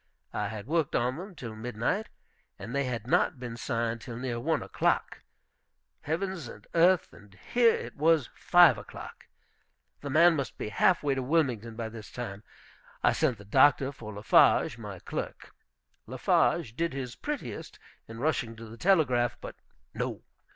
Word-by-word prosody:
I 105 Hz, -, -1 dB
had 105 Hz, 0 st, -6 dB
worked 160 Hz, +1 st, 0 dB
on 125 Hz, +3 st, 0 dB
them 185 Hz, +2 st, -8 dB
till 115 Hz, -7 st, -7 dB
midnight, 120 Hz, -, -2 dB, 0.5 s
and 115 Hz, -, -8 dB
they 140 Hz, 0 st, 0 dB
had 120 Hz, -4 st, -3 dB
not 130 Hz, +1 st, +2 dB
been 120 Hz, -2 st, -6 dB
signed 115 Hz, -2 st, -2 dB
till 115 Hz, 0 st, -7 dB
near 125 Hz, -1 st, -3 dB
one 155 Hz, +5 st, 0 dB
o'clock. -, -, 0 dB, 0.8 s
Heavens 170 Hz, -1 st, -3 dB
and 105 Hz, -2 st, -12 dB
earth, 175 Hz, +1 st, +4 dB
and 100 Hz, -1 st, -17 dB, 0.2 s
here 240 Hz, -2 st, +5 dB
it -, -, -7 dB
was 155 Hz, -3 st, +3 dB
five 170 Hz, -10 st, +5 dB
o'clock! -, -, -11 dB, 0.7 s
The 140 Hz, -, -6 dB
man 165 Hz, +4 st, +6 dB
must 140 Hz, -6 st, -4 dB
be -, -, -4 dB
half 175 Hz, -, +3 dB
way 145 Hz, -2 st, +2 dB
to 135 Hz, -, -2 dB
Wilmington 125 Hz, -6 st, 0 dB
by 115 Hz, -1 st, -4 dB
this 110 Hz, -2 st, -10 dB
time. 110 Hz, -5 st, -6 dB, 0.6 s
I -, -, +4 dB
sent 120 Hz, -, +1 dB
the 100 Hz, -, -13 dB
doctor 135 Hz, +4 st, +4 dB
for 115 Hz, -6 st, -9 dB
Lafarge, 105 Hz, -, +4 dB
my -, -, -7 dB
clerk. -, -, -6 dB, 0.5 s
Lafarge 110 Hz, -, +1 dB
did 170 Hz, +1 st, -1 dB
his 130 Hz, -3 st, -5 dB
prettiest 285 Hz, -, -6 dB, 0.3 s
in 115 Hz, -, -9 dB
rushing 125 Hz, -4 st, -1 dB
to 115 Hz, +1 st, -10 dB
the 115 Hz, +1 st, -11 dB
telegraph. 130 Hz, -10 st, +2 dB
But -, -, -8 dB, 0.4 s
no! -, -, -4 dB
125 Hz, 165 wpm, -29 LUFS, 115-160 Hz, 0.8 s, man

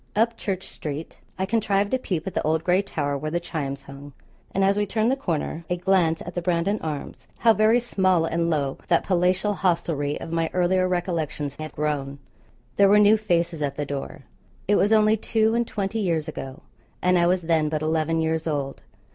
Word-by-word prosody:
Up 230 Hz, +2 st, +2 dB
Church 190 Hz, -4 st, -4 dB
street 150 Hz, +1 st, -7 dB, 0.2 s
I 190 Hz, -, 0 dB
contrived 205 Hz, -1 st, 0 dB
a 260 Hz, -, +2 dB
peep 175 Hz, -9 st, -3 dB
at 190 Hz, -, -4 dB
the -, -, 0 dB
old 160 Hz, +1 st, 0 dB
gray 180 Hz, +2 st, +3 dB
tower 145 Hz, -7 st, -2 dB
where 150 Hz, +2 st, -3 dB
the 170 Hz, +2 st, -1 dB
chimes 140 Hz, -5 st, -4 dB
hung; 140 Hz, +1 st, -11 dB, 0.4 s
and 195 Hz, -, +1 dB
as 195 Hz, +1 st, +3 dB
we 205 Hz, 0 st, 0 dB
turned 220 Hz, +4 st, +1 dB
the -, -, +2 dB
corner 170 Hz, -, -3 dB
a 180 Hz, -, 0 dB
glance 175 Hz, -3 st, +2 dB
at 175 Hz, -, -8 dB
the 175 Hz, -, -2 dB
'Brandon 175 Hz, +4 st, 0 dB
Arms.' 150 Hz, -3 st, -6 dB
How 230 Hz, -1 st, +5 dB
very 220 Hz, +3 st, +4 dB
small 185 Hz, -8 st, +1 dB
and 170 Hz, +1 st, 0 dB
low 140 Hz, -4 st, -1 dB
that 170 Hz, -, +3 dB
palatial 185 Hz, +3 st, +1 dB
hostelry 165 Hz, -6 st, 0 dB
of 165 Hz, -, -7 dB
my 165 Hz, -1 st, 0 dB
earlier 185 Hz, +1 st, +2 dB
recollections 165 Hz, -5 st, -2 dB
had 155 Hz, 0 st, -7 dB
grown! 140 Hz, -2 st, -2 dB, 0.6 s
There 200 Hz, -1 st, +6 dB
were 205 Hz, -, +6 dB
new 210 Hz, +1 st, +6 dB
faces 170 Hz, -6 st, 0 dB
at 140 Hz, -1 st, -1 dB
the 145 Hz, -, -3 dB
door. 140 Hz, +1 st, -6 dB, 0.4 s
It 205 Hz, -, +3 dB
was 205 Hz, +1 st, +3 dB
only 215 Hz, 0 st, +5 dB
two 220 Hz, +1 st, +1 dB
and 235 Hz, 0 st, +1 dB
twenty 205 Hz, +2 st, -2 dB
years 165 Hz, -6 st, 0 dB
ago, 135 Hz, -1 st, -7 dB, 0.4 s
and 180 Hz, 0 st, +4 dB
I 175 Hz, -1 st, +4 dB
was 180 Hz, 0 st, +1 dB
then 160 Hz, -2 st, +2 dB
but 155 Hz, 0 st, -2 dB
eleven 160 Hz, +1 st, 0 dB
years 160 Hz, 0 st, -1 dB
old. 140 Hz, -3 st, -3 dB
170 Hz, 205 wpm, -24 LUFS, 155-195 Hz, 0.6 s, There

